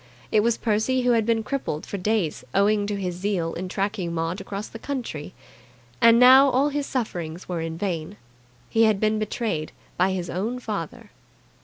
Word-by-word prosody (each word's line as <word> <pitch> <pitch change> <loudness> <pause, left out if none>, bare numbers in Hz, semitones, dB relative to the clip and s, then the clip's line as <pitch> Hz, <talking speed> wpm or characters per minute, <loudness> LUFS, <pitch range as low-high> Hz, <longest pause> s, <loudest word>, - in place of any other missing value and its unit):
It 215 - +4
was 230 +2 +2
Percy 225 +4 +1
who 245 - +3
had 225 -2 +2
been 225 -1 +2
crippled 220 - -3
for 200 - -5
days 195 -5 0
owing 205 +1 +3
to 205 - -2
his 180 -2 -2
zeal 180 -2 -2
in 185 - -5
tracking 195 -2 -2
Maud 165 +3 -2
across 200 +1 -5
country. 225 - -5 0.7
And 230 0 +7
now 260 +2 +8
all 270 +3 +2
his 290 -1 -2
sufferings 175 -9 -4
were 175 -2 -3
in 165 0 -4
vain. 180 0 -3 0.5
He 225 0 +3
had 215 -3 +2
been 215 0 +1
betrayed 210 -7 -2 0.3
by 185 +1 +2
his 180 -2 -3
own 215 +9 -2
father. 210 -9 -6
205 Hz, 175 wpm, -24 LUFS, 180-230 Hz, 0.7 s, now